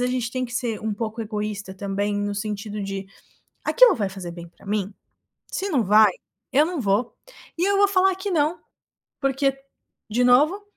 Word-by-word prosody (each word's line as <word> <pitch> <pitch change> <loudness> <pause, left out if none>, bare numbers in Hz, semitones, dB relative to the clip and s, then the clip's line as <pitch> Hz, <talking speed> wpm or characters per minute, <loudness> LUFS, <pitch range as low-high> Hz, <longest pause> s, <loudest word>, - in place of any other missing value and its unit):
a 250 - +2
gente 250 -2 -1
tem 255 0 -2
que 240 - -12
ser 235 -3 -2
um 220 -1 -2
pouco 225 +1 -4
egoísta 210 -2 -4
também, 200 +1 -2
no 205 0 -2
sentido 210 0 -4
de: 195 0 -4 0.6
"Aquilo - - +6
vai 200 -3 -1
fazer 185 -3 -7
bem 170 0 -9
pra 175 - -21
mim? 200 -1 -2 0.5
Se 395 - -3
não 260 - +1
vai, 210 +1 +6 0.4
eu 290 +3 +5
não 345 -5 -3
vou 210 +3 0 0.4
e 355 - +2
eu 400 - +3
vou 405 0 +6
falar 380 -1 +3
que 390 +1 -4
não, 315 0 +1 0.6
porque, 270 0 +1 0.5
de 245 +3 +1
novo, 300 +11 +4
225 Hz, 185 wpm, -24 LUFS, 205-280 Hz, 0.6 s, Aquilo